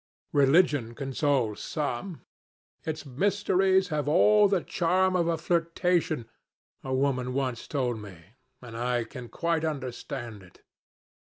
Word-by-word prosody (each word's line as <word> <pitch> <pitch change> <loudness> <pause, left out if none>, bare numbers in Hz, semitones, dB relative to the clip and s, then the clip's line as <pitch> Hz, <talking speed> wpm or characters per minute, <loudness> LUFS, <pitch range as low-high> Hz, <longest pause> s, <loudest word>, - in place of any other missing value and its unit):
Religion 140 -4 +3
consoles 135 -4 0
some. 150 +3 -4 0.6
Its 155 -1 -4
mysteries 190 +4 +2
have 150 -2 -2
all 210 +6 +5
the 195 -3 +1
charm 185 +2 +1
of 170 -2 +2
a 165 -1 +1
flirtation, 165 -4 0 0.6
a 130 - -5
woman 130 -1 0
once 130 -3 -2
told 125 -6 -1
me, 100 -4 -10 0.5
and 115 -2 -9
I 120 0 0
can 120 +1 -9
quite 170 -1 -1
understand 130 -6 -5
it. 90 -1 -19
145 Hz, 120 wpm, -28 LUFS, 125-170 Hz, 0.6 s, all